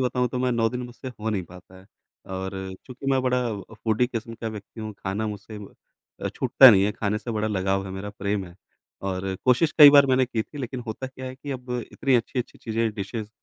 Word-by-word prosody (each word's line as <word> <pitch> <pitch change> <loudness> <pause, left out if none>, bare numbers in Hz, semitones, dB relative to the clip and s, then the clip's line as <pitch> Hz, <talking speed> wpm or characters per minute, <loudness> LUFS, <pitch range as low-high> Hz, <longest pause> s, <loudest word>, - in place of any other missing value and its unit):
बताऊँ 125 -1 +1
तो 125 - -3
मैं 125 -1 +1
9 115 -1 +2
दिन 125 0 -4
मुझसे 125 +2 -8
हो 110 -2 -4
नहीं 100 -4 -1
पाता 90 +2 -15
है। 95 - -18 0.5
और 95 +1 -4 0.3
चूँकि 130 +1 -9
मैं 135 -1 +3
बड़ा 125 0 +2 0.4
फूडी 110 +2 +1
किस्म 115 -2 -5
का 115 0 -5
व्यक्ति 110 +1 -9
हूँ 110 0 -5
खाना 100 +3 -2
मुझसे 105 +1 -7 0.7
अ, - - +1
छूटता 130 -2 +7
नहीं 100 -2 +5
है, 105 - +1
खाने 105 0 -1
से 115 - -6
बड़ा 110 0 -1
लगाव 95 -1 0
है, - - -6
मेरा 100 +2 -5
प्रेम 100 -1 -2
है। 85 - -14 0.5
और 95 0 -2
कोशिश 130 +5 +3
कई 145 -1 +12
बार 140 -1 +7
मैंने 130 0 +3
की 115 -3 -1
थी 145 - -12
लेकिन 125 -1 -4
होता 110 +4 -4
क्या 130 0 -9
है 130 - -6
कि 140 +2 -8
अब 125 -2 -6 0.2
इतनी 135 -2 +1
अच्छी-अच्छी 120 +1 -3
चीज़ें 115 0 -1
डिशेज़ 105 +1 -5
115 Hz, 225 wpm, -25 LUFS, 100-125 Hz, 0.7 s, कई